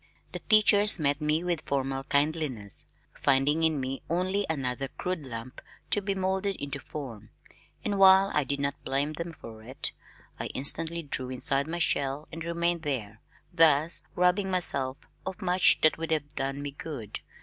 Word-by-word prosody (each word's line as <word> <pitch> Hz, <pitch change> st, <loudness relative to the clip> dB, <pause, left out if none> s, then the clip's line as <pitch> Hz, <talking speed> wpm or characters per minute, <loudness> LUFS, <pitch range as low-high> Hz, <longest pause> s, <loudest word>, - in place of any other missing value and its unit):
The -, -, -6 dB
teachers 210 Hz, -1 st, +6 dB
met 145 Hz, -2 st, 0 dB
me 155 Hz, +2 st, +1 dB
with 175 Hz, -3 st, -1 dB
formal 135 Hz, -1 st, -2 dB
kindliness, 140 Hz, -8 st, -1 dB, 0.3 s
finding 140 Hz, +3 st, +2 dB
in 160 Hz, -3 st, +2 dB
me 130 Hz, +1 st, -4 dB
only 185 Hz, +4 st, -1 dB
another 135 Hz, -3 st, -2 dB
crude 180 Hz, +6 st, -4 dB
lump 125 Hz, -2 st, -8 dB, 0.3 s
to 205 Hz, -, +2 dB
be 195 Hz, 0 st, -2 dB
moulded 190 Hz, +1 st, -1 dB
into 140 Hz, -3 st, -5 dB
form, 125 Hz, -8 st, -8 dB, 0.6 s
and 200 Hz, -1 st, -1 dB
while 190 Hz, 0 st, +7 dB
I 150 Hz, -, +2 dB
did 140 Hz, +1 st, -3 dB
not 140 Hz, 0 st, -3 dB
blame 140 Hz, +3 st, -1 dB
them 170 Hz, +2 st, -5 dB
for 115 Hz, -8 st, -12 dB
it, 125 Hz, +5 st, -4 dB, 0.5 s
I -, -, -3 dB
instantly 165 Hz, +5 st, +1 dB
drew 130 Hz, -3 st, -5 dB
inside 135 Hz, +2 st, 0 dB
my 170 Hz, +2 st, -4 dB
shell 145 Hz, -3 st, -1 dB
and 165 Hz, 0 st, -7 dB
remained 170 Hz, 0 st, -1 dB
there 115 Hz, -8 st, -4 dB, 0.3 s
thus 160 Hz, -1 st, +5 dB
robbing 180 Hz, +2 st, +2 dB
myself 140 Hz, -8 st, +5 dB, 0.3 s
of 190 Hz, +2 st, -6 dB
much 180 Hz, -2 st, +3 dB
that 155 Hz, +1 st, +3 dB
would 165 Hz, -, -4 dB
have 150 Hz, -2 st, -1 dB
done 135 Hz, 0 st, -3 dB
me 145 Hz, -, -4 dB
good. 135 Hz, -7 st, -7 dB
150 Hz, 165 wpm, -28 LUFS, 135-175 Hz, 0.6 s, while